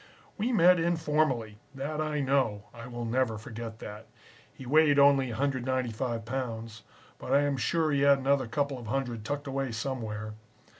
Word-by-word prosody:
"We 225 +4 -1
met 180 -5 +5
informally. 150 -10 0 0.2
That 150 +3 -3
I 150 -1 -1
know. 130 -7 +1
I 115 0 -9
will 120 -1 -5
never 115 -1 0
forget 110 +1 -7
that. 105 -2 -9 0.4
He 135 - -12
weighed 150 +2 +4
only 140 -2 +5
195 125 -2 -2
pounds, 115 -3 -4 0.4
but - - -6
I 140 - +5
am 145 -1 +1
sure 155 +5 +1
he 140 -1 +1
had 140 0 +6
another 135 -1 +1
couple 140 +2 -1
of 120 - -9
hundred 120 -2 -2
tucked 145 +5 -3
away 135 -2 -2
somewhere. 110 -3 -4
130 Hz, 160 wpm, -29 LUFS, 115-145 Hz, 0.4 s, had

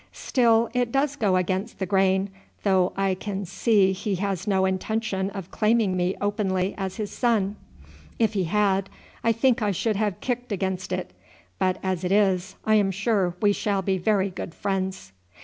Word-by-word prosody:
"Still 230 -2 +2
it 245 -1 0
does 275 +2 +1
go 205 -8 +1
against 185 +4 -1
the 190 - -2
grain, 190 +1 +2 0.3
though 190 -3 +3
I 195 -1 +1
can 195 +1 -4
see 200 +1 +3
he 195 +1 -2
has 195 0 -2
no 190 -2 +2
intention 190 0 -1
of 195 -3 -8
claiming 215 -3 +2
me 180 +1 0
openly 200 -2 0
as 190 -1 -4
his 215 -3 -4
son. 215 -5 +1 0.6
If 225 -1 +2
he 190 -3 0
had, 195 +1 +1 0.3
I 230 - +4
think 235 +2 +2
I 210 - +1
should 205 +2 0
have 205 -3 -1
kicked 245 -1 -3
against 190 -2 -2
it; 185 - -3 0.5
but 185 -1 +1
as 185 -2 -1
it 180 - -1
is, 190 -2 +2
I 215 - +3
am 200 -2 +3
sure 195 -2 0
we 205 0 +5
shall 200 -1 -1
be 190 0 0
very 200 0 +1
good 175 -2 -7
friends." 190 - -3
195 Hz, 180 wpm, -25 LUFS, 190-215 Hz, 0.6 s, we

